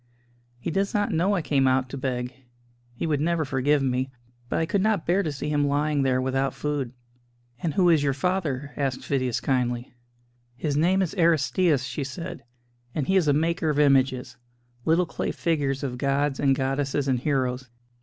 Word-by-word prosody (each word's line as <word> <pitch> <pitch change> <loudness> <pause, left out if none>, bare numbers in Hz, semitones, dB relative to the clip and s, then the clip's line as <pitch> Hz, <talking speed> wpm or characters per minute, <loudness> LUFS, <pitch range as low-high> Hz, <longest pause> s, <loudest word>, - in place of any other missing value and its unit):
He 165 - -3
does 195 +4 0
not 205 0 +1
know 185 +5 +2
I 175 - -1
came 135 -3 +2
out 130 0 +2
to 140 - -6
beg 125 -2 -3 0.6
he - - -3
would 150 -3 0
never 165 0 +1
forgive 135 +2 +1
me; 130 0 0 0.4
but - - 0
I 165 - +1
could 190 +4 0
not 210 -4 +1
bear 180 +4 +2
to 160 - -2
see 145 +1 -4
him 145 -1 +2
lying 145 0 +1
there 130 -1 +2
without 135 +1 0
food." 145 -5 -2 0.7
"And 160 -4 -2
who 185 -2 +4
is 165 -4 +5
your 140 -2 +1
father?" 145 -4 -1
asked 135 -3 -2
Phidias 130 -4 0
kindly. 125 -2 -1 0.6
"His 145 +3 -2
name 180 +6 +3
is 175 - -3
Aristćus," 165 -3 +3
she 140 +2 -3
said, 135 +1 -6 0.5
"and 150 - 0
he 190 - +1
is 180 -5 +3
a - - +5
maker 160 +2 +1
of 150 - 0
images 135 -3 +2 0.5
little 165 +3 +3
clay 160 - -3
figures 145 -4 -1
of 125 -3 -3
gods 140 +1 0
and 135 -1 +3
goddesses 135 +1 -1
and 130 -2 +2
heroes. 130 -2 -1
145 Hz, 185 wpm, -25 LUFS, 130-160 Hz, 0.7 s, is